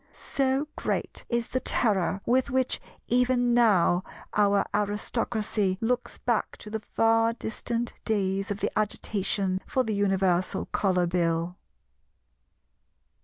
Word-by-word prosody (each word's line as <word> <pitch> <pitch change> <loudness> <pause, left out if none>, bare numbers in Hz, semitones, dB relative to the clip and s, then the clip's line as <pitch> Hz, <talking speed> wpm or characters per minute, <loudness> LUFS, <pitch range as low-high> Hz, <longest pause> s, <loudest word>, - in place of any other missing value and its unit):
So 270 +2 0
great - - -3
is 235 -1 -1
the 255 - 0
terror 200 -6 +1
with 260 +3 +2
which 260 -1 0 0.3
even 245 0 +3
now 190 -6 +4 0.3
our 205 -1 +3
Aristocracy 210 -1 -1
looks 245 +2 -1
back 235 -3 -1
to 210 - -10
the 220 - -2
far 225 +1 +2
distant 235 +1 -3
days 195 -2 0
of 205 0 -3
the - - 0
agitation 195 -2 -1
for 260 - +1
the 220 -3 -2
Universal 190 -2 +1
Colour 185 -3 +2
Bill. 170 0 0
210 Hz, 120 wpm, -27 LUFS, 190-240 Hz, 0.3 s, now